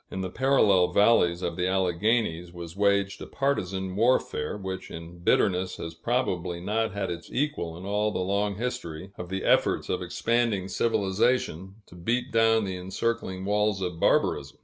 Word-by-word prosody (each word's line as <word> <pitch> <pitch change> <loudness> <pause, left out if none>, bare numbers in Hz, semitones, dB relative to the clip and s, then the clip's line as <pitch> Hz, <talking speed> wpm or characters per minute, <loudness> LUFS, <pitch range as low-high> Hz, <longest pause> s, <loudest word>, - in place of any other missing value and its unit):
In 95 - -4
the 95 -1 -4
parallel 105 -8 +4
valleys 90 -2 +3
of 85 -1 -2
the 90 0 +1
Alleghanies 95 -1 0
was 85 -1 -9
waged 100 -1 +1
a - - -7
partisan 95 -9 -2
warfare, 115 -6 +1
which 95 -1 -6
in 85 +1 -9
bitterness 90 +1 +2
has 85 0 -6
probably 90 -3 -1
not 110 +5 -1
had 95 -1 -3
its 85 0 -7
equal 130 - -2
in 90 - -9
all 105 +1 +1
the - - -3
long 100 +2 0
history 95 -7 -5
of 90 -2 -7
the 95 0 -3
efforts - - +2
of - - -1
expanding 115 -5 0
civilization 95 -3 0
to - - -17
beat 120 +9 -2
down 115 -1 +3
the 95 -1 -4
encircling 95 0 -3
walls 105 0 +1
of 90 -3 -4
barbarism. - - +1
95 Hz, 165 wpm, -27 LUFS, 90-110 Hz, -, parallel